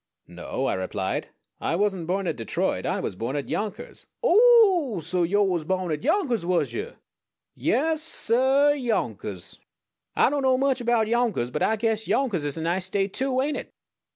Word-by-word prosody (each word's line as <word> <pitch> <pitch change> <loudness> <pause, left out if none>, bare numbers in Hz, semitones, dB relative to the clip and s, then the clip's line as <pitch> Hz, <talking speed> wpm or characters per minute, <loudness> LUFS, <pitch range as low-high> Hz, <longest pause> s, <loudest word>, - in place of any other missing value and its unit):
"No," - - -4
I - - +1
replied, 95 +1 -3 0.3
"I 165 - -1
wasn't 190 -3 0
born 195 +2 -1
at 165 -4 -1
Detroit; 115 -3 -2
I - - -1
was - - -4
born 115 +8 -3
at 145 - -4
Yonkers 210 -1 -4
" - - -54
"O 480 - +4
o 405 - +5
oh! - - -2
So 175 +3 -2
yo' 200 +5 +2
was 180 -5 0
born 185 +1 -1
at 150 0 -3
Yonkers, 275 - +1
was 175 0 0
yuh? 455 +4 -5 0.6
Yaas, 315 +2 0
suh 270 -1 +2
Yonkers! 120 - -2 0.6
Ah - - +4
don't 290 -1 0
know 260 -1 +3
much 270 -1 +1
erbout 235 -2 +2
Yonkers; 230 - 0
but 150 - -3
Ah 220 - +2
guess 220 0 -1
Yonkers 215 - 0
is 145 0 -3
a 160 - -3
nice 175 +3 -1
State 195 0 -1
too, 260 -1 0
ain't 295 +1 -1
it?" - - -7
210 Hz, 190 wpm, -25 LUFS, 170-270 Hz, 0.6 s, o